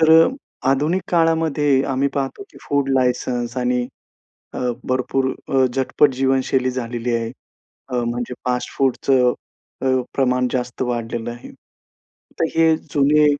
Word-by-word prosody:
तर 160 0 +5
अ, - - +2 0.4
आधुनिक 150 +7 +1
काळामध्ये 160 -5 +2
आम्ही 135 +1 +1
पाहतो 140 - -2
की - - -14
फूड 140 -1 +1
लायसन्स 125 -1 -1
आणि 125 -1 0 0.7
अ, - - -4 0.2
भरपूर 130 +1 0 0.2
अ, 135 -1 +3
झटपट 135 +2 +2
जीवनशैली 130 -1 +1
झालेली 120 -1 -3
आहे. 115 0 -2 0.6
अ, - - -5
म्हणजे 120 +1 -3
फास्टफूडचं 125 0 +1 0.5
अ,, 130 -1 +3
प्रमाण 125 -1 +2
जास्त 125 0 -2
वाढलेलं 120 -1 -3
आहे. 120 0 -10 0.9
तर - - +3
हे, 160 -1 +5
जुने 150 0 +3
130 Hz, 125 wpm, -21 LUFS, 125-140 Hz, 0.9 s, तर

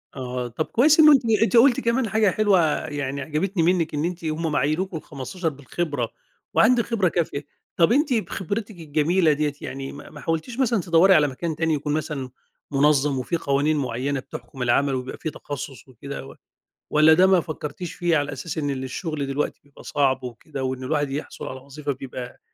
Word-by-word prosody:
آه، 125 -2 -4
طب 120 +7 -3
كويس 295 +6 +4
إنه 305 -1 +9
أنتِ 275 -3 +6 0.2
أنتِ 235 +1 +3
قلتِ 240 +1 +6
كمان 235 +1 0
حاجة 215 0 +3
حلوة 205 -1 +3 0.3
يعني 140 -1 -3
عجبتني 165 +6 -1
مِنك، 170 -2 +2
إن 150 +1 0
أنتِ 175 -1 -4
هم 160 +1 -1
أما 150 - +1
عينوكم 165 +5 -1
15 160 +4 -4
بالخبرة 145 -3 -3 0.4
وعندِك 235 0 +4
خبرة 220 -6 +1
كافية. 160 -4 -2 0.3
طب 170 +4 +5
أنتِ 285 +2 +3
بخبرتك 210 -1 -3
الجميلة 160 +2 +2
دِيَّة 150 0 -1
يعني 135 0 -6
ما 145 - -11
ما 150 - -11
حاولتيش 165 +10 -3
مثلًا 235 -6 +2
تدوري 175 +2 +5
على 150 -2 +5
مكان 155 +4 -4
تاني؟ 160 0 +1
يكون 150 0 -1
مثلًا 150 -4 -3 0.4
منظم 140 -1 +3
وفي 150 +7 -2
قوانين 145 0 +1
معيّنة 135 +1 -1
بتحكم 125 0 -9
العمل، 135 +3 +2
وبيبقى 130 0 -5
في 160 - -4
تخصص 145 -3 -7
وكده 135 +2 -8
و - - -12 0.5
والّا 155 +1 +6
ده 180 +4 +6
ما 190 -2 +5
فكرتيش 155 +1 -6
فيه؟ 175 -2 +1
على 145 0 -1
أساس 155 +5 -6
إن 145 -2 -1
الشغل 140 +3 -4
دلوقتي 135 +2 -2
بيبقى 145 -1 -17
صعب 135 -2 +1
وكده، 130 +3 -6
وإن 130 0 -3
الواحد 145 +1 0
يحصل 145 +3 -5
على 130 - -6
وظيفة 140 +2 -5
بيبقى 125 -2 -7
150 Hz, 185 wpm, -24 LUFS, 140-180 Hz, 0.5 s, إنه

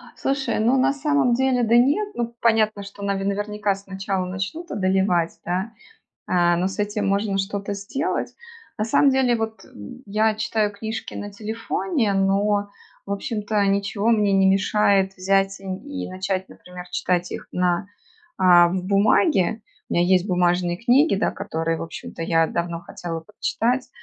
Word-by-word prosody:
Слушай, 270 -5 -1
ну, 240 +5 +3
на 270 +1 +3
самом 285 -3 +1
деле, 255 0 +2
да 230 +1 +4
нет, 295 +13 +3
ну, 235 0 -3
понятно, 215 -3 +2
что 200 0 -10
нави 200 -1 -1
наверняка, 205 0 -1
сначала 195 -1 -4
начнут 195 - -5
одолевать, 185 -3 +1
да, 185 +6 -2 0.6
а, 175 -1 +3
но 180 +2 0
с 195 - -8
этим 205 0 -1
можно 200 0 0
что-то 200 +1 -3
сделать. 270 - -3 0.4
На 215 - 0
самом 275 +5 +4
деле, 260 -3 +2
вот 220 0 -4 0.4
я 215 +2 +1
читаю 215 -1 0
книжки 220 +2 -6
на 205 - -6
телефоне, 225 - -2
но 200 +1 +1 0.4
в 200 - -3
общем-то 210 0 -1
ничего 200 +2 0
мне 210 -3 +3
не 195 0 +4
мешает 195 0 +2
взять 195 +1 +1
и - - -14
н 190 -1 -3
и 285 +3 -6
начать, 190 0 -3
например, 180 0 -11
читать 180 0 -1
их - - -7
на, 180 +1 0 0.5
а, 175 -2 +6
б 180 +1 -2
бумаге. 200 - +2 0.3
У - - -3
меня 175 - +3
есть 185 +1 +3
бумажные 175 -1 +1
книги, 250 - +3
да, 195 - +1
которые 165 0 -3
в - - -5
общем-то 165 0 -7
я 165 -1 +2
давно 170 -1 -3
хотела 170 -1 -6
прочитать, 230 +7 -2
200 Hz, 160 wpm, -23 LUFS, 185-225 Hz, 0.6 s, а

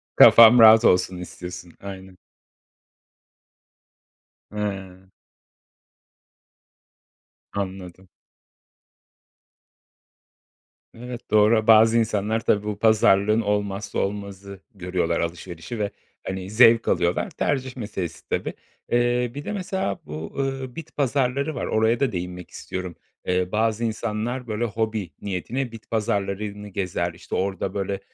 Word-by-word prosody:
Kafam 115 +1 +9
rahat 110 +1 +8
olsun 90 0 +3
istiyorsun. 90 -1 -9
Aynen. 95 -1 -9 2.3
Hıı. 95 -3 -5 2.4
Anladım. 95 -2 -6 2.8
Evet, 120 0 -9
doğra. 110 +1 +4
Bazı 115 +1 +6
insanlar 110 0 0
tabii 105 -2 +1
bu 105 -1 -4
pazarlığın 110 -1 +4
olmazsa 105 -1 -2
olmazı 100 -1 -5 0.2
görüyorlar 90 -3 -1
alışverişi 85 +5 -5
ve, 100 -1 -1 0.4
hani, 95 0 -4
zevk 115 +1 +5
alıyorlar 85 0 +1
tercih 130 -2 -2
meselesi 100 -7 -6
tabii. - - -2 0.4
Eee, 120 0 +1
bir 145 +1 -7
de - - -3
mesela 190 - -3
bu, 75 +2 -7 0.3
eee, 130 -2 -8
bit 165 -2 -9
pazarları 140 +1 0
var - - -3
oraya 110 +2 +1
da 135 -4 +1
değinmek 90 -1 -6
istiyorum. 90 -2 -6 0.3
Eee, 90 0 0
bazı 110 +1 0
insanlar 115 +2 -3
böyle 110 +2 -2
hobi 110 -4 -3
niyetine 115 +7 -3
bit 115 -1 -12
pazarlarını 105 -2 -2
gezer. 90 -3 -3
İşte 90 - -7
orada 95 0 -2
böyle 100 0 -3
105 Hz, 105 wpm, -23 LUFS, 95-115 Hz, 2.8 s, Kafam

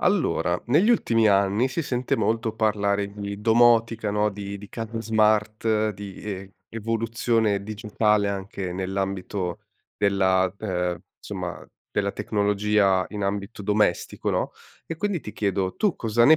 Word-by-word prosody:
Allora, 175 - +1
negli 155 - +4
ultimi 115 - +3
anni 100 +5 +3
si 130 - -2
sente 125 -3 -1
molto 115 0 0
parlare 100 -2 +1
di 100 0 -6
domotica, 115 -1 +4
no? 105 +1 +1
Di 100 0 -6
di 100 0 -11
case 115 +1 -5
smart, 110 0 +2
di 100 -1 -8
e 95 -2 -6
evoluzione 115 -1 0
digitale 105 0 +1
anche 95 -2 -4
nell'ambito 95 -1 -3 0.4
della 95 -2 +2
ehm, 90 -4 -1 0.2
insomma - - -6 0.3
della 100 -1 0
tecnologia 105 -2 +2
in 105 -1 -4
ambito 100 +2 -3
domestico, 105 -2 +1
no? - - 0 0.4
E 165 - -5
quindi 195 0 -1
ti 105 - -8
chiedo, 100 -2 -1
tu 205 -5 +2
cosa 115 +1 +2
ne 155 +5 +8
105 Hz, 135 wpm, -25 LUFS, 100-115 Hz, 0.4 s, ne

